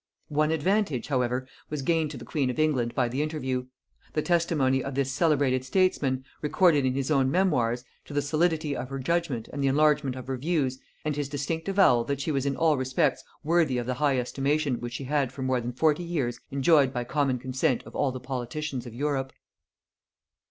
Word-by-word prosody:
One 150 0 +2
advantage, 160 - 0
however, 125 -1 0 0.2
was 150 -2 -3
gained 160 +1 +1
to - - -7
the - - -9
queen 140 -5 0
of 125 - -3
England 135 -7 +1
by 125 -3 +2
the 130 +4 -2
interview; 130 -5 -2 0.5
the 155 - 0
testimony 150 -7 +2
of 135 -1 -5
this 135 -1 0
celebrated 135 -4 +2
statesman, 135 -4 +1 0.2
recorded 150 -2 +3
in 130 0 +1
his 135 +2 -1
own 135 -3 +3
memoirs, 125 -9 +1 0.2
to - - -10
the 145 - +2
solidity 155 0 +1
of 130 - -5
her 135 - -4
judgement 140 -4 -1
and 140 - -2
the - - +3
enlargement 150 -1 +3
of 130 -1 -7
her 130 0 -3
views; 135 -3 0 0.3
and 150 -1 0
his 145 -1 -2
distinct 155 +5 -3
avowal 190 -12 +4
that 140 -1 -2
she 150 +3 -1
was 140 -1 0
in 140 - 0
all 160 -3 +3
respects 130 +2 0 0.2
worthy 160 -4 +2
of 120 - -2
the 125 - -1
high 140 0 +1
estimation 135 +2 0
which 120 0 -6
she 135 - -4
had 140 -1 0
for 135 - -6
more 130 -1 +1
than 120 +1 -3
forty 150 +6 +2
years 135 -9 -2
enjoyed 140 0 +4
by 125 -2 -2
common 135 0 0
consent 130 0 0
of - - -13
all 135 - +1
the 130 - -6
politicians 130 +1 -4
of 115 - -9
Europe. 135 -1 -1
140 Hz, 200 wpm, -27 LUFS, 130-155 Hz, 0.5 s, avowal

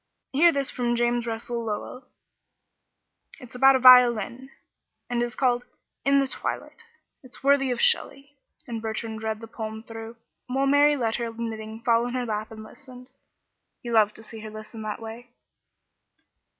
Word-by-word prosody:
Hear 335 +5 +6
this 280 -3 -1
from 240 -1 -1
James 240 0 0
Russell 235 +1 -4
Lowell. 225 +4 -5 1.3
It's 250 -4 -13
about 270 +2 +5
a - - +2
violin, 250 0 +6 0.6
and 240 -1 0
is 240 0 -3
called 245 -2 +1 0.4
'In 275 0 +3
the 275 - +2
Twilight.' 460 - -5 0.4
It's 255 -2 -13
worthy 275 -1 +3
of 245 - -2
Shelley." 290 - +1 0.3
And 230 -3 -5
Bertrand 220 0 -4
read 220 0 -3
the 225 - -8
poem 220 -1 -7
through, 225 0 -9 0.3
while 265 +2 0
Mary 290 +1 +4
let 225 -3 -1
her 235 -1 -3
knitting 225 -1 -6
fall 235 0 +2
in 245 - -5
her 250 -1 -1
lap 215 -1 -3
and 220 -1 -10
listened. 255 +1 -14 0.7
He 240 - -5
loved 215 -2 +3
to 220 - -9
see 225 0 -10
her 215 0 -8
listen 215 +1 -10
in - - -6
that 215 +1 -5
way. 230 +2 -9
240 Hz, 165 wpm, -25 LUFS, 225-260 Hz, 1.3 s, Hear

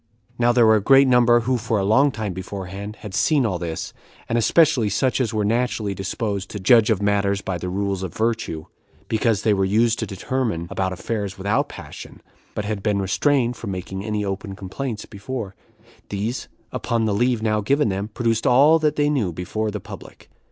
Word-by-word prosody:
Now 120 0 +4
there 120 -1 +4
were 110 0 +6
a - - -1
great 135 +5 +6
number 120 -1 +5
who 125 +1 0
for 110 0 -1
a 100 - 0
long 130 +8 +4
time 110 -7 -4
beforehand 95 +2 -6
had 105 -3 -8
seen 140 +5 +2
all 95 -6 -1
this, 80 -2 -5 0.3
and 115 - -1
especially 125 -1 +3
such 130 +6 +1
as 115 - 0
were 105 -2 0
naturally 115 -2 0
disposed 100 +1 -3
to 105 - -6
judge 115 +3 +5
of 105 -3 +1
matters 100 -1 +1
by 95 -3 -3
the 90 - -4
rules 100 0 -2
of 95 -3 -4
virtue, 110 -8 -2 0.4
because 110 -1 +1
they 110 - +3
were 95 -1 +1
used 110 +4 +2
to 110 - -2
determine 105 -2 -2
about 95 -1 -1
affairs 100 +1 -4
without 100 +3 0
passion, - - -10 0.4
but 105 - -3
had 105 -1 -3
been 105 -1 0
restrained 120 +6 +1
from 110 - -7
making 95 +1 -5
any 105 -1 -2
open 95 0 -4
complaints 110 +4 -5
before; 100 0 -6 0.6
these, 105 +5 -3 0.2
upon 115 -2 -1
the 105 - +1
leave 120 +1 +1
now 105 -1 +1
given 140 +4 +2
them, 100 +2 -2
produced 115 0 -1
all 145 +6 +6
that 150 -1 +1
they 145 0 +2
knew 130 -11 0
before 100 +6 -3
the 105 0 -4
public. 100 0 -12
105 Hz, 195 wpm, -22 LUFS, 100-120 Hz, 0.6 s, were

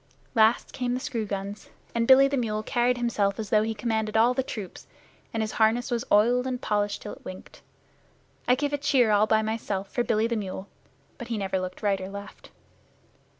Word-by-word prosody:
Last 225 0 +3
came 245 -1 -1
the - - -2
screw 230 -4 -3
guns, 200 +1 -5 0.2
and 230 0 0
Billy 270 +1 +8
the 275 - -1
mule 215 -4 -1
carried 245 +1 +1
himself 210 -5 0
as 215 -2 -5
though 215 - +5
he 220 +1 -2
commanded 220 -1 -1
all 235 +3 +5
the 265 - 0
troops, 210 -8 -7 0.4
and 225 -1 -1
his 215 - -3
harness 230 +3 +2
was 235 0 0
oiled 240 +5 +4
and 250 -1 -2
polished 205 -4 -1
till 205 - -6
it - - -14
winked. 185 0 -10 0.9
I 250 - +5
gave 290 +2 -2
a 290 - 0
cheer 270 -6 +3
all 210 +1 +4
by 220 0 +3
myself 210 -3 -3
for 240 - 0
Billy 220 -1 +1
the 230 0 -1
mule, 195 -2 -5 0.5
but 240 - -7
he 230 -2 -2
never 190 -2 -1
looked 185 +2 -6
right 200 -2 +1
or 185 - -5
left. 200 0 -10
220 Hz, 205 wpm, -26 LUFS, 205-245 Hz, 0.9 s, Billy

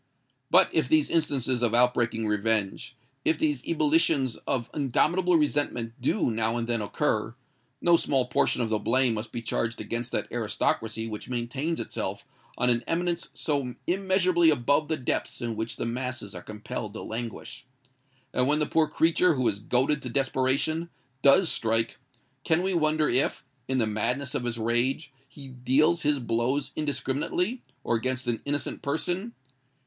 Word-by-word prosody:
But - - +6
if - - +1
these 315 -2 +3
instances 135 -6 +1
of 120 -1 +2
outbreaking 120 -2 +2
revenge—if 115 +6 -1
these 150 -5 0
ebullitions 155 -5 +2
of 125 -4 -1
indomitable 170 +6 +2
resentment 145 -6 0
do 130 - +1
now 110 +1 0
and 115 -1 -2
then 120 -2 0
occur, 110 0 -1 0.5
no 170 -1 +5
small 135 -5 +1
portion 125 - +1
of 115 - -2
the 110 - +1
blame 125 +2 +2
must 110 0 -5
be 120 -1 -5
charged 115 +1 -2
against 120 +1 -3
that - - 0
aristocracy 110 0 -1
which 105 +1 -7
maintains 130 +7 -2
itself - - -4 0.3
on 125 0 +3
an 120 0 +1
eminence 175 0 -1
so 140 -5 -2
immeasurably 185 -2 +3
above 145 +2 +2
the 160 - -1
depths 125 - -2
in 115 -1 -3
which 110 +2 -3
the - - -3
masses 125 -3 -4
are 90 - -7
compelled 105 +1 -6
to 110 - -7
languish. 120 +2 -7 0.7
And 125 0 +2
when 150 +1 +3
the 150 - +1
poor 160 +1 +2
creature 165 +2 +3
who 130 -3 +1
is 100 -2 0
goaded 130 +7 +1
to 125 - -5
desperation, 135 +5 +1 0.3
does 160 +5 +5
strike—can 115 +8 -1
we 190 0 0
wonder 155 -2 +2
if, 130 +3 +1 0.2
in 130 - 0
the 115 - +3
madness 120 +6 -2
of 120 - -2
his 120 -1 -2
rage, 120 +6 0 0.2
he 140 -1 -11
deals 135 +7 +2
his 150 -1 +2
blows 120 +3 -1
indiscriminately, 155 - -1 0.2
or 120 - +1
against 130 +2 -2
an 120 -2 -1
innocent 145 0 -2
person? 180 +9 -2
130 Hz, 160 wpm, -27 LUFS, 115-155 Hz, 0.7 s, But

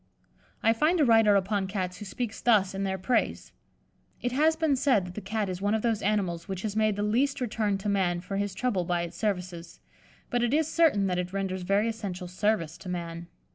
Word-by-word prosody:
I 225 - +5
find 310 +9 +2
a 295 - +5
writer 225 -3 +5
upon 195 0 +1
Cats 185 -2 -3
who 210 - -8
speaks 225 +2 -4
thus 210 -6 +3
in 195 0 -2
their 190 0 -1
praise: 190 +7 -1 0.7
"It 245 - -2
has 310 +5 +3
been 320 -3 +2
said 255 -8 +2
that 180 - -8
the 215 - -6
Cat 210 +1 -2
is 185 0 -5
one 205 +2 +1
of 220 - -2
those 225 -3 +1
animals 190 -5 -1
which 190 -1 -5
has 215 -2 -3
made 215 -1 +2
the 205 - -2
least 265 +7 +1
return 215 -4 0
to 195 +2 -6
man 185 -4 +1
for 195 +2 -5
his 200 -1 -2
trouble 210 -5 0
by 175 0 -1
its 170 - -7
services; 180 -5 -3 0.5
but 245 - +1
it 240 +4 +2
is 315 -1 +2
certain 315 -13 +3
that 180 -2 0
it 180 +1 -4
renders 190 -1 -2
very 200 +4 +1
essential 200 -5 -4
service 180 -3 -1
to 190 -1 -8
man." 170 -1 -5
200 Hz, 220 wpm, -28 LUFS, 185-225 Hz, 0.7 s, I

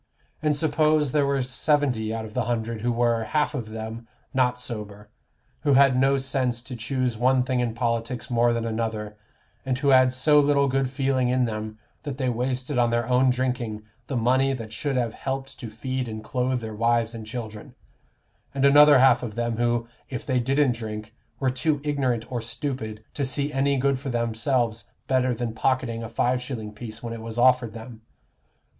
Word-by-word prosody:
And 150 -1 +2
suppose 155 -1 +2
there 145 -1 +2
were 140 -1 +1
seventy 130 -4 +1
out 115 0 -3
of 105 - -10
the - - -1
hundred 115 -2 -2
who 120 +2 0
were, 115 -1 +1
half 150 +7 0
of 120 -7 -4
them, 110 +1 -7 0.3
not 125 -1 +2
sober, 105 -4 -6 0.5
who 145 -2 +2
had 135 -1 +6
no 135 +2 +3
sense 130 -3 -1
to 130 -1 -7
choose 125 0 -2
one 130 +1 +3
thing 130 0 -1
in 120 -2 -1
politics 115 0 -2
more 120 -1 +2
than 115 -1 -1
another, 110 -2 -3 0.5
and 130 -2 -1
who 140 +1 +1
had 130 -1 +6
so 150 +4 +4
little 140 -1 +3
good 135 0 0
feeling 130 -2 0
in 125 0 +2
them 110 -1 -5 0.2
that 140 -2 -5
they 130 -2 0
wasted 125 +2 -1
on 120 -1 +3
their 120 0 0
own 130 +1 +4
drinking 125 -4 -2 0.2
the 135 - -2
money 130 +3 +2
that 115 -4 -7
should 135 +4 -2
have 120 -2 0
helped 135 0 -5
to 120 - -6
feed 130 +3 -4
and 110 -1 -6
clothe 125 +2 -1
their 110 -1 -6
wives 115 +1 +1
and 110 -2 -8
children; 110 -2 -7 0.8
and 135 0 +2
another 145 +1 +8
half 125 -2 +5
of 110 -4 -6
them 120 -1 -1
who, 120 -1 0 0.2
if 125 -3 -5
they 130 -2 +1
didn't 135 +2 +2
drink, 110 -2 -6 0.3
were 130 -2 +1
too 145 +3 0
ignorant 130 -6 0
or 120 -2 -2
stupid 115 -2 -5
to 145 - -2
see 140 +3 -1
any 140 +1 +2
good 135 0 +1
for 140 0 -5
themselves 115 -1 -1 0.2
better 130 -1 +2
than 120 -1 -3
pocketing 115 -1 0
a 115 - -6
five 125 +2 0
shilling 115 -5 -6
piece 110 +1 -8
when 115 -1 -4
it 115 - -7
was 115 0 -6
offered 125 -2 +4
them. 115 0 -10
125 Hz, 190 wpm, -25 LUFS, 115-135 Hz, 0.8 s, another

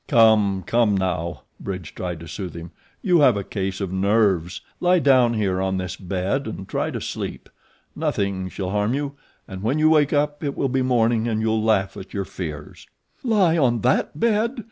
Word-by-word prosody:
"Come! 105 -4 +4
come! 115 -4 +2
now," 90 -3 -2 0.2
Bridge 90 -6 -6
tried 90 -3 -5
to 85 - -9
soothe 90 0 -6
him. 85 0 -8 0.3
"You 180 -4 +4
have 130 -7 +5
a 100 - -2
case 95 -1 -3
of 95 -2 -3
nerves. 95 -3 +1 0.2
Lie 180 +1 +4
down 130 -6 +4
here 95 -4 0
on 95 0 0
this 90 -2 -4
bed 95 +8 -2
and 95 -3 -6
try - - -1
to - - -4
sleep. - - -6 0.5
Nothing 95 -2 -1
shall 95 0 -4
harm 105 +4 0
you, 145 0 -2 0.4
and 95 -1 -7
when 120 +8 0
you 155 +1 +4
wake 150 -3 +4
up 145 +1 0
it 140 -2 -3
will 135 - 0
be 130 +1 +1
morning 120 -2 +2
and 110 -2 0
you'll 110 0 +1
laugh 100 -3 +1
at 95 - -10
your 100 -1 -2
fears." 75 -6 -7 0.4
"Lie 195 -9 +3
on 120 -5 +2
THAT 125 +2 +1
bed!" 230 +3 +1
110 Hz, 190 wpm, -23 LUFS, 95-135 Hz, 0.5 s, have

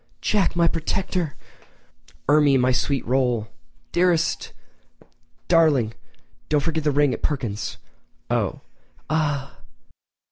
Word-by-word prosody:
"Jack, 205 -4 +1
my 170 -1 +4
protector!" 170 -1 -2 0.9
"Ermie, 145 -1 +5
my 130 0 +3
sweet 135 +1 0
roll!" 125 -3 +1 0.4
"Dearest!" 175 -2 +1 1.0
"Darling!—and 145 -10 +3 0.5
don't 150 -1 +3
forget 160 0 -1
that - - +4
ring 145 -2 +3
at - - -6
Perkins'." 105 - -3 0.5
"Oh!" - - -1 0.5
"Ah!" 145 - -1
145 Hz, 100 wpm, -23 LUFS, 130-165 Hz, 1.0 s, Ermie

